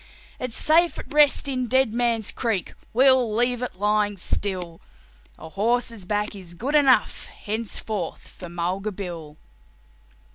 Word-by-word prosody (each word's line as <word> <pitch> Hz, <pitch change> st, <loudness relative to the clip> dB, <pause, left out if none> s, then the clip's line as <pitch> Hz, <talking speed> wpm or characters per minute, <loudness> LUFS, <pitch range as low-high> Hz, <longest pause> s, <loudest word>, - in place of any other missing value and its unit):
It's 250 Hz, -3 st, -4 dB
safe 335 Hz, +2 st, +3 dB
at -, -, -8 dB
rest 295 Hz, -1 st, +4 dB
in 255 Hz, -2 st, -1 dB
Dead 260 Hz, -2 st, +2 dB
Man's 235 Hz, -3 st, 0 dB
Creek 220 Hz, -7 st, -2 dB, 0.2 s
we'll 255 Hz, -3 st, +4 dB
leave 245 Hz, +1 st, +1 dB
it 250 Hz, -, -4 dB
lying 205 Hz, +1 st, +1 dB
still; 180 Hz, -2 st, -3 dB, 0.6 s
A 160 Hz, -, -10 dB
horse's 230 Hz, +2 st, -1 dB
back 210 Hz, +2 st, -2 dB
is 180 Hz, -3 st, -10 dB
good 260 Hz, -, -3 dB
enough 270 Hz, -7 st, +3 dB
henceforth 210 Hz, -3 st, -5 dB
for 180 Hz, -, -10 dB
Mulga 180 Hz, +5 st, -2 dB
Bill." 170 Hz, -6 st, -7 dB
215 Hz, 135 wpm, -24 LUFS, 190-250 Hz, 0.6 s, rest